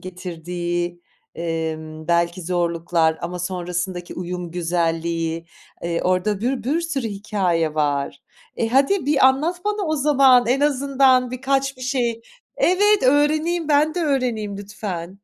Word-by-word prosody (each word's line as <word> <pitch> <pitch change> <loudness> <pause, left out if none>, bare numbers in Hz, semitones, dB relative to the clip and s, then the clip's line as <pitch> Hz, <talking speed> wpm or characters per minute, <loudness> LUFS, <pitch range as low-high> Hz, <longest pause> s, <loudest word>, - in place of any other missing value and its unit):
getirdiği, 175 -1 -4 0.3
emm, 160 -1 -4
belki 170 +1 +1
zorluklar 170 -2 0
ama 180 +1 -4
sonrasındaki 180 0 -4
uyum 180 -1 -5
güzelliği, 165 -1 -1 0.4
eee, 170 0 -2
orada 185 +2 0
bir 245 +1 -1
bir 295 +7 +1
sürü 290 -8 -2
hikâye 190 -6 -1
var. 145 -2 -1 0.3
E, 225 - 0
hadi 275 - +2
bir 280 -3 +5
anlat 315 +8 +1
bana 415 -2 -1
o 310 0 0
zaman 270 -4 +5
en 255 +4 +2
azından 270 -3 +3
birkaç 270 +1 -1
bir 255 - -11
şey. 245 -3 -1 0.4
Evet, 410 +3 +4
öğreneyim, 310 +5 +2
ben 300 +1 +3
de 355 - -1
öğreneyim 245 -9 -1
lütfen. 195 -3 -6
200 Hz, 130 wpm, -22 LUFS, 170-275 Hz, 0.4 s, bir